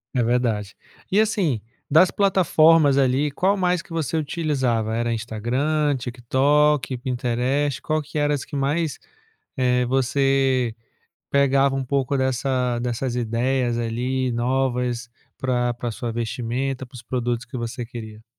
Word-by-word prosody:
É 120 - +2
verdade. 115 -4 0 0.4
E 200 - +4
assim, 185 - +1 0.3
das 160 +5 +6
plataformas, 165 -7 +4
ali, 135 +2 +2
qual 195 +7 +1
mais 180 -2 +1
que 175 - -21
você 160 -2 -1
utilizava? 130 -8 -1
Era 120 0 0
Instagram, 130 +7 0
TikTok, 130 +3 +1
Pinterest 125 +2 -1
qual 155 0 0
que 150 +1 -7
era 145 0 +2
as 140 - -3
que 145 - -8
mais, 150 +3 0 0.6
eh 125 -1 +2
você 135 -1 +1 0.5
pegava 140 -1 +3
um 135 - -1
pouco 135 +1 0
dessa 130 -2 0
dessas 120 +1 -2
ideias, 120 +1 0
ali, 125 +2 -1
novas 125 -1 -1 0.3
pra 125 -2 0
pra 120 0 -4
sua 115 +1 -4
vestimenta, 125 +3 -3
para 130 +1 -17
os 120 - -10
produtos 120 0 -2
que 125 +1 -7
você 120 +1 -4
queria? 110 -2 -9
130 Hz, 135 wpm, -23 LUFS, 120-145 Hz, 0.6 s, das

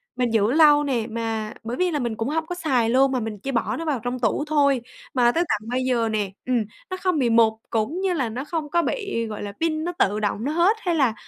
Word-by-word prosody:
mình 245 -2 0
giữ 220 +1 +3
lâu 295 -1 +6
nè 245 -5 -1
mà 225 -1 -3
bởi 240 +3 -4
vì 365 -1 +1
là 295 - -1
mình 235 -3 -2
cũng 230 +4 -2
hông 320 +1 -1
có 355 - -5
xài 260 -9 +1
luôn 265 +2 +4
mà 255 - 0
mình 215 -3 -5
chỉ 275 +6 -4
bỏ 235 - 0
nó 330 - -4
vào 290 -5 0
trong 245 +1 -3
tủ 235 +5 +1
thôi, 280 -4 +3 0.3
mà 240 -2 +4
tới 335 +6 +1
tận 215 +1 -1
bây 255 +1 0
giờ 235 -3 +1
nè, 210 -3 -1
ừm, 250 -1 +1 0.3
nó 370 - -4
không 365 -5 +1
bị 245 -3 +2
mục 225 -1 +5 0.2
cũng 235 - -1
như 380 -2 +1
là 265 -9 -1
nó 245 +5 -4
không 310 -2 -3
có 340 +3 +2
bị, 400 - -2
gọi 210 -1 -6
là, 205 - -5
pin 315 -1 0
nó 350 - -2
tự 205 +2 +2
động 210 +1 -1
nó 285 - -1
hết 345 +7 +3
hay 355 -5 -1
là, 265 -7 +3
255 Hz, 270 wpm, -23 LUFS, 225-315 Hz, 0.3 s, lâu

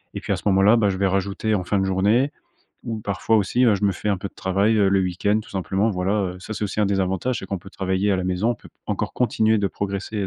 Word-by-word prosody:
et - - -2
puis - - -4
à - - +1
ce - - -10
moment-là, 100 +3 +5
bah, 105 -3 +3
je 95 - -2
vais 100 - +1
rajouter 100 +3 -1
en 95 - 0
fin 100 +3 0
de 95 - +1
journée 105 +9 +2 0.5
ou 115 -2 -4
parfois 105 +2 0
aussi, 110 +5 +2
ben, 110 - +5
je 100 +1 -2
me 100 - +4
fais 100 - -4
un 100 - +2
peu 100 +1 -5
de - - -26
travail, 100 +4 +1
heu, 100 -2 +4
le 95 0 +3
week-end, 95 +4 0
tout - - -16
simplement, 95 +3 0
voilà, 95 0 -1 0.2
heu. - - -10
Ça, 95 - -7
c'est 105 - -5
aussi 100 +1 -5
un 105 - +3
des 100 0 +1
avantages, 95 +7 -1
c'est 95 - -8
qu'on 100 - -3
peut 95 +3 -13
travailler 95 +1 0
à - - +2
la 95 - -2
maison. 95 +5 0
On - - 0
peut - - -16 0.2
encore - - -2
continuer 110 -2 +2
de 100 - +1
progresser, 100 +2 -4
100 Hz, 290 wpm, -23 LUFS, 95-110 Hz, 0.5 s, moment-là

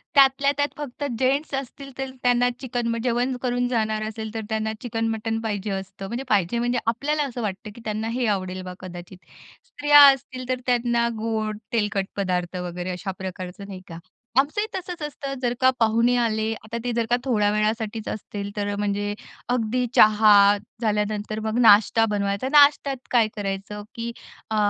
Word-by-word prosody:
त्यातल्या 275 0 +5
त्यात 285 0 +2
फक्त 290 -1 -6 0.2
जेन्ट्स 275 +3 +1
असतील 275 +1 -6
तर 270 0 -3
त्यांना 245 0 +3
चिकन. 245 -2 -3
मग 230 - -1
जेवण 250 +1 0
करून 245 -1 0
जाणार 215 -3 0
असेल 220 0 -6
तर 225 - -3
त्यांना 220 0 -1
चिकन, 225 -1 -2
मटण 225 0 -2
पाहिजे 210 -2 -3
असतं. 195 0 -5
म्हणजे 240 +5 -4
पाहिजे 205 +3 +2
म्हणजे 245 0 0
आपल्याला 290 +6 0
असं 250 -3 -5
वाटतं, 210 +1 -4
की 235 - -12
त्यांना 215 +1 -2
हे 250 - 0
आवडेल 185 0 -6
बा 180 - -6
कदाचित. 180 0 -9 0.5
स्त्रिया 290 0 +5
असतील 255 -1 -8
तर 255 -1 0
त्यांना 240 -1 +2
गोड, 220 -1 -2 0.2
तेलकट 210 -3 0
पदार्थ 180 -2 -1
वगैरे 180 0 -4
अशा 185 +2 -4
प्रकारचं, 185 0 -6
नाही 190 -2 -8
का. 165 -1 -9 0.4
आमचंही 365 +11 +1
तसंच 360 -3 -6
असतं. 280 -2 -5
जर 245 -1 +1
का 260 - +6
पाहुणे 230 +2 +3
आले 220 -2 0
आता 225 +2 -5
ते 245 - -1
जर 230 -1 0
का 245 - +4
थोड्या 210 -6 +2
वेळासाठीच 215 +1 -1
असतील 205 -1 -5
तर 205 0 -2
म्हणजे 205 0 -1 0.4
अगदी 245 +2 0
चहा 215 0 +6 0.5
झाल्यानंतर 210 0 -1
मग 220 +1 -2
नाश्ता 225 0 +6
बनवायचा. 200 +3 -1
नाश्त्यात 285 -2 +5
काय 235 -3 +4
करायचं, 200 0 -4
की 235 0 -4 0.4
अ, - - 0
225 Hz, 170 wpm, -24 LUFS, 205-245 Hz, 0.5 s, का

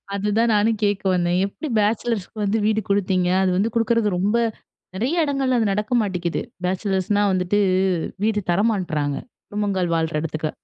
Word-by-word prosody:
அதுதான், 210 +3 +1
நானும் 215 +1 +2
கேட்க 205 -1 +1
வந்தேன். 175 0 +1
எப்படி 255 +10 -6
பேச்சுலர்ஸுக்கு 215 0 -1
வந்து 205 +2 +1
வீடு 220 0 +2
கொடுத்தீங்க? 190 -2 +1 0.2
அது 185 - +2
வந்து 220 +3 0
கொடுக்குறது 230 -2 +2
ரொம்ப, 205 +6 +1 0.6
நெறைய 295 - +1
இடங்கள்ல 270 -3 0
அது 210 -3 +1
நடக்க 210 +3 -3
மாட்டேங்குது. 180 -5 -2 0.2
பேச்சுலர்ஸ்னா 190 +2 0
வந்துட்டு, 185 +3 +1 0.7
வீடு 215 -1 +1
தர 175 +4 +2
மாட்றாங்க. 155 -8 -2 0.3
குடும்பங்கள் 195 -4 -1
வாழ்ற 160 0 -1
இடத்துக்கு. 155 -1 -3
205 Hz, 145 wpm, -22 LUFS, 180-220 Hz, 0.7 s, நானும்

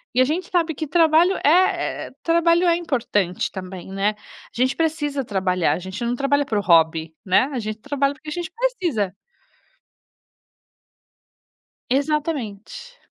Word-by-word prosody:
e 255 - +5
a - - +5
gente 330 +9 -2
sabe 335 -3 +1
que 310 +2 -4
trabalho 330 +3 +4
é 290 - +6
é 365 +3 +2
é - - -13
trabalho 335 +1 +3
é 340 - +4
importante 230 - -1
também, 185 -1 -8
né. 195 +2 +1 0.4
A - - -23
gente 255 +2 +1
precisa 295 -4 -1
trabalhar, 185 -4 0
a - - -3
gente 190 +4 -6
não 240 +1 0
trabalha 285 +2 +1
por 220 -6 -1
hobby, 160 -4 +3
né, 185 +4 +4
a 255 - -2
gente 215 -1 -5
trabalha 280 +2 0
porque 305 - -10
a - - -6
gente 350 +1 -4
precisa. 350 - -1 2.7
Exatamente. 285 - -2
275 Hz, 150 wpm, -22 LUFS, 205-330 Hz, 2.7 s, é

